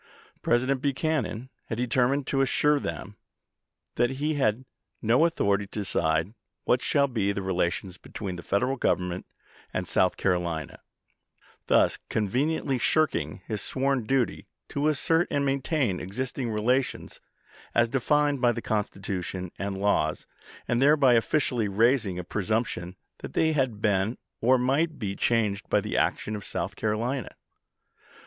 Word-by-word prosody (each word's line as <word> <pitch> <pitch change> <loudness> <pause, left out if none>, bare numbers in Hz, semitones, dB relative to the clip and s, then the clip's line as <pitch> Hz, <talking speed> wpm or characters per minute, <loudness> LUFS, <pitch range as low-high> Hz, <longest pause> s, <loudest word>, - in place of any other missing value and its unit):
President 130 +2 +1
Buchanan 135 -4 -1 0.2
had 110 - -3
determined 125 +3 +1
to 135 0 +1
assure 145 +2 +3
them 105 -6 -6 0.8
that 120 +1 +3
he 145 +4 -1
had 130 -3 0 0.3
"no 120 +8 +4
authority 100 -11 +1
to 105 - -6
decide 80 -1 0 0.3
what 125 - +2
shall 140 -1 +2
be 110 -6 0
the 100 -1 -3
relations 90 0 -1
between 95 -3 -6
the 85 - -7
Federal 125 +10 0
Govern 90 -6 +1
ment 90 +1 -6 0.4
and 90 -1 -3
South 90 +2 +2
Carolina," 85 -5 -1 0.4
— - - -33
thus - - +3
conveniently 130 +6 0
shirking 90 - +1
his 105 -2 -3
sworn 135 -1 0
duty 130 0 0 0.2
to 145 +1 0
assert 165 +3 +2
and 140 0 0
maintain 135 - 0
existing 125 +5 -3
relations 125 +5 -1 0.5
as 120 0 +4
defined 145 +3 +1
by 120 -1 +5
the 120 - -3
Constitution 95 -4 -3
and 100 -1 -3
laws, 95 -6 +1 0.4
and 120 +1 +1
thereby 140 -2 +5
officially 120 -1 +1
raising 110 -1 +2
a 90 - -4
presump 110 +5 0
tion 90 -2 -6 0.2
that - - -8
they 160 0 +3
had 130 -8 -1
been 105 +2 +1 0.2
or 130 +3 +4
might 140 +6 +1
be 100 -4 -3
changed 105 -4 0
by - - +4
the - - -4
action 110 - 0
of 105 - -6
South 90 +4 -3
Carolina. 115 +4 -2
115 Hz, 145 wpm, -27 LUFS, 100-135 Hz, 0.8 s, by